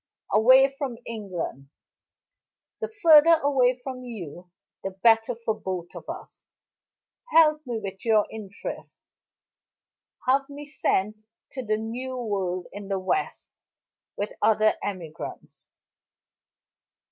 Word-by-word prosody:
"Away 260 +4 +7
from 275 -3 -5
England! 185 - -5 1.1
The - - -2
further 335 -6 +7
away 255 -3 +3
from 255 0 -7
you 180 -7 -8 0.3
the 195 - -2
better 225 +4 +3
for 230 -1 -2
both 185 -4 -5
of - - -10
us. - - -9 0.8
Help 310 -3 +5
me 240 -2 -2
with 195 -2 -7
your 220 -2 +4
interest; 205 -3 -8 1.3
have 275 +2 +2
me 290 +1 -8
sent 215 -7 -1 0.3
to 260 - -5
the 215 -2 0
new 250 +4 -5
world 190 -6 -2
in 205 -1 -8
the 195 -1 -1
west, 190 - -2 0.7
with 205 - -3
other 215 0 +4
emigrants. 175 -6 -7
225 Hz, 110 wpm, -26 LUFS, 195-260 Hz, 1.3 s, Away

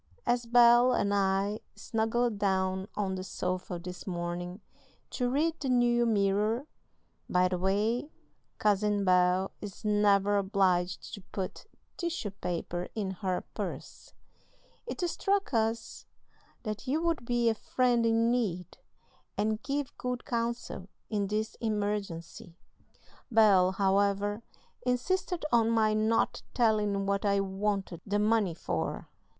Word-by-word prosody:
As 240 -1 +1
Bel 240 +1 +6
and 200 -3 +1
I 200 +1 +1 0.2
snuggled 225 0 -1
down 190 -1 0
on 195 -2 -1
the 185 0 -4
sofa 185 -1 -3
this 180 +2 -8
morning 175 +1 -4 0.5
to 245 -1 -1
read 315 +5 0
the 270 - -2
New 240 -1 +3
Mirror 210 +4 +1 0.6
(by 180 0 +3
the 180 -1 -2
way, 210 - 0 0.5
Cousin 205 -1 +2
Bel 180 +1 +3
is 205 +1 -8
never 205 -1 +3
obliged 185 -3 +1
to 200 - -6
put 190 - -5 0.3
tissue 340 - -3
paper 175 -2 -4
in 200 -4 -2
her 185 -1 -2
purse), - - -7 0.7
it - - -5
struck 390 +2 0
us 225 0 -1 0.6
that 215 +2 -5
you 285 +5 +1
would 335 -5 0
be 240 0 +1
a 225 - +4
friend 245 +1 +1
in 230 +1 +3
need, 195 -8 -2 0.6
and 215 +1 0
give 285 -1 -3
good 250 -1 -3
counsel 235 -5 -3 0.2
in 205 -2 0
this 215 +2 -2
emergency. 205 -6 -3 0.7
Bel, 200 -5 +5
however, 200 +2 +1 0.4
insisted 325 +7 -1
on 230 -1 +4
my 220 -2 +3
not 220 +1 +1
telling 210 -4 +2
what 200 0 0
I 200 -1 +2
wanted 195 -2 -2
the 205 0 -1
money 210 -4 +2
for. 80 - -3
210 Hz, 125 wpm, -30 LUFS, 190-235 Hz, 0.7 s, Bel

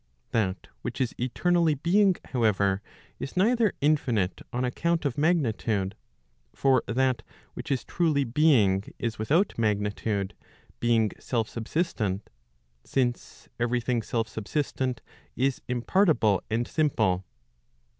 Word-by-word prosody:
That 95 -4 0 0.2
which - - -5
is 130 -3 0
eternally 165 +6 +2
being, 185 +6 +3
however, 100 -5 +1 0.4
is 135 - -6
neither 225 +2 +3
infinite 125 -10 +1
on 125 +1 -1
account 165 +5 0
of 140 - +1
rnagni 150 -5 +2
tude; 100 -4 -1 0.6
for 135 -3 +3
that 130 +1 +1 0.3
which - - -7
is 130 - 0
truly 155 -5 +1
being 120 -8 +3
is 115 -2 -3
without 160 - +2
magnitude, 105 -2 0 0.5
being 115 -3 +2
self 115 -3 -1
subsistent; 110 - -2 0.5
since 125 -3 -2
every 120 +1 +1
thing 120 0 0
self 115 +1 -2
subsistent 125 +3 -2 0.3
is 135 +1 0
impartible 125 - +2
and 115 +2 0
simple. 110 - +1
120 Hz, 115 wpm, -27 LUFS, 110-150 Hz, 0.6 s, being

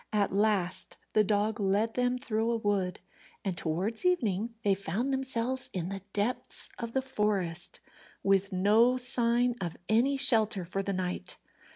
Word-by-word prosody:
At 205 -3 0
last 200 -3 0 0.2
the 215 - +4
dog 210 +1 0
led 205 +3 +1
them 250 0 0
through 230 -3 -1
a 230 - 0
wood, 200 -4 -1 0.5
and 190 -2 -1
towards 180 +8 -2
evening 230 - 0
they 200 - +3
found 200 +8 -2
themselves 260 -1 0
in 180 -1 -3
the 195 0 -5
depths 210 +5 -1
of 235 -1 -5
the 265 - 0
forest, 195 -8 -2 0.4
with 195 0 +2
no 215 +7 +3
sign 245 -1 +2
of 170 -3 -4
any 250 +6 +2
shelter 220 -8 +6
for 195 +3 -3
the 200 - -3
night. 180 - -4
215 Hz, 155 wpm, -29 LUFS, 195-240 Hz, 0.5 s, shelter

